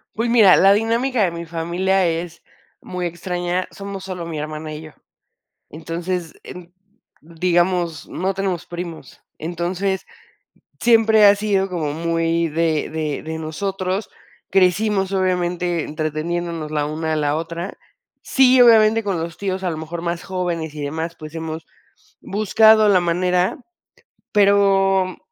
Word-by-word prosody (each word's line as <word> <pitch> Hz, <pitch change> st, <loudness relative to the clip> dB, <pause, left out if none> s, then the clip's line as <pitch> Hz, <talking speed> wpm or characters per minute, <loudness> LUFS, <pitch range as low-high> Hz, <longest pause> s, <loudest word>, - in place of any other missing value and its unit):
Pues 230 Hz, +2 st, -1 dB
mira, 220 Hz, -6 st, +7 dB
la 195 Hz, +1 st, +6 dB
dinámica 230 Hz, +2 st, +1 dB
de 175 Hz, -, +1 dB
mi 170 Hz, 0 st, -6 dB
familia 175 Hz, +3 st, 0 dB
es 165 Hz, 0 st, -3 dB, 0.4 s
muy 180 Hz, -1 st, -4 dB
extraña, 175 Hz, +1 st, -3 dB
somos 200 Hz, -1 st, -7 dB
solo 180 Hz, -3 st, -6 dB
mi 160 Hz, -2 st, -5 dB
hermana 155 Hz, +1 st, -5 dB
y 150 Hz, -, -7 dB
yo. 155 Hz, -, -11 dB, 0.8 s
Entonces, 165 Hz, +2 st, -4 dB
en 180 Hz, 0 st, -11 dB, 0.5 s
digamos, 175 Hz, 0 st, 0 dB
no 190 Hz, +2 st, -2 dB
tenemos 190 Hz, -3 st, -2 dB
primos. 175 Hz, -2 st, -8 dB, 0.2 s
Entonces, 175 Hz, +4 st, -2 dB, 0.8 s
siempre 225 Hz, -2 st, +5 dB
ha 200 Hz, -, +8 dB
sido 200 Hz, -2 st, 0 dB
como 165 Hz, -6 st, -3 dB
muy 165 Hz, +1 st, 0 dB
de 160 Hz, -1 st, 0 dB
de 155 Hz, -2 st, -3 dB
de 160 Hz, 0 st, -5 dB
nosotros. 190 Hz, +5 st, -3 dB, 0.4 s
Crecimos 195 Hz, +1 st, +2 dB
obviamente, 180 Hz, -2 st, 0 dB
entreteniéndonos 155 Hz, +1 st, -3 dB
la 150 Hz, -1 st, -1 dB
una 160 Hz, +1 st, -3 dB
a -, -, +1 dB
la 150 Hz, -1 st, 0 dB
otra. 170 Hz, +3 st, -5 dB, 0.5 s
Sí, 260 Hz, -1 st, +4 dB
obviamente, 225 Hz, -1 st, +6 dB
con 195 Hz, -5 st, -1 dB
los 165 Hz, 0 st, -5 dB
tíos 190 Hz, -1 st, -3 dB
a 180 Hz, -, 0 dB
lo 160 Hz, -, -5 dB
mejor 165 Hz, +2 st, -6 dB
más 170 Hz, 0 st, -3 dB
jóvenes 175 Hz, -4 st, -3 dB
y 150 Hz, -, -6 dB
demás, 160 Hz, +3 st, -4 dB
pues, 155 Hz, 0 st, -10 dB
hemos 160 Hz, 0 st, -6 dB, 0.6 s
buscado 215 Hz, +1 st, +4 dB
la 195 Hz, -3 st, +5 dB
manera, 180 Hz, +3 st, 0 dB, 0.8 s
pero, 195 Hz, -2 st, +3 dB
175 Hz, 135 wpm, -20 LUFS, 165-195 Hz, 0.8 s, ha